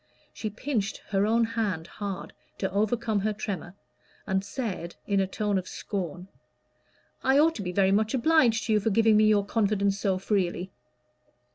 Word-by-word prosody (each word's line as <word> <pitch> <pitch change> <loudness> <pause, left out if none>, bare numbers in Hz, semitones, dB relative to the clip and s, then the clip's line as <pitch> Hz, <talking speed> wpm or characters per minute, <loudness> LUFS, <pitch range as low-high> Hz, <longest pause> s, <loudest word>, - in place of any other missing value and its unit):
She 215 - -4
pinched 220 -1 -2
her 200 0 +2
own 230 +1 +3
hand 220 -8 -1
hard 195 +1 -6 0.2
to 190 - -2
overcome 215 +2 0
her 215 +2 0
tremor, 195 -3 -5 0.5
and 190 0 0
said, 195 -8 -4
in 200 -1 +1
a 190 - +1
tone 205 0 0
of 185 - -8
scorn 180 -2 -5 1.0
"I 265 +1 +4
ought 320 +3 +5
to - - -4
be 180 -2 -3
very 190 +1 +3
much 215 +4 +2
obliged 250 -5 +3
to 225 - +1
you 210 - +4
for 210 - 0
giving 220 +1 +4
me 215 0 +5
your 210 -2 +4
confidence 200 -2 +1
so 195 -2 +1
freely." 185 -2 -1
205 Hz, 170 wpm, -27 LUFS, 195-225 Hz, 1.0 s, ought